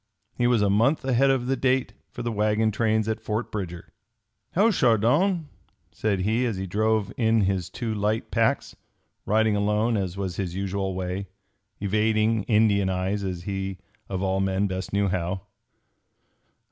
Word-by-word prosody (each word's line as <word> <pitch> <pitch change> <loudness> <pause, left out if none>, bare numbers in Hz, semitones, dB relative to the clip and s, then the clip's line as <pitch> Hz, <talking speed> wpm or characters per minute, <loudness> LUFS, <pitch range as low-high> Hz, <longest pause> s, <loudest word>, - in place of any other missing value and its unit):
He 120 - +1
was 120 -4 +3
a 100 - +3
month 125 +8 +2
ahead 135 +1 +3
of 130 -2 +1
the 135 +1 +1
date 130 0 +1 0.2
for 120 - -7
the 120 - -1
wagon 105 +1 +1
trains 110 0 +1
at 110 0 -2
Fort 110 +1 -3
Bridger. 90 -5 -6 0.6
"How, 210 +6 +4
Chardon!" 150 - +2 0.4
said 100 -3 -1
he 110 +6 +1
as 110 -5 -2
he 95 - -3
drove 110 +2 0
in 115 -2 +3
his 95 -3 0
two 115 -3 -3
light 105 +1 -1
packs, - - +1 0.5
riding 110 0 +3
alone 105 +3 +1
as 95 -2 -3
was 95 -3 -3
his 90 -3 -3
usual 95 0 -2
way, 95 +1 -3 0.5
evading 110 +1 +1
Indian 105 -3 +3
eyes 95 +2 -1
as 90 -3 -4
he 95 0 -3 0.3
of 95 -1 -2
all 95 0 +1
men 95 +1 +1
best 95 -1 -4
knew 100 0 +1
how. 90 0 -2
105 Hz, 160 wpm, -25 LUFS, 95-115 Hz, 0.6 s, How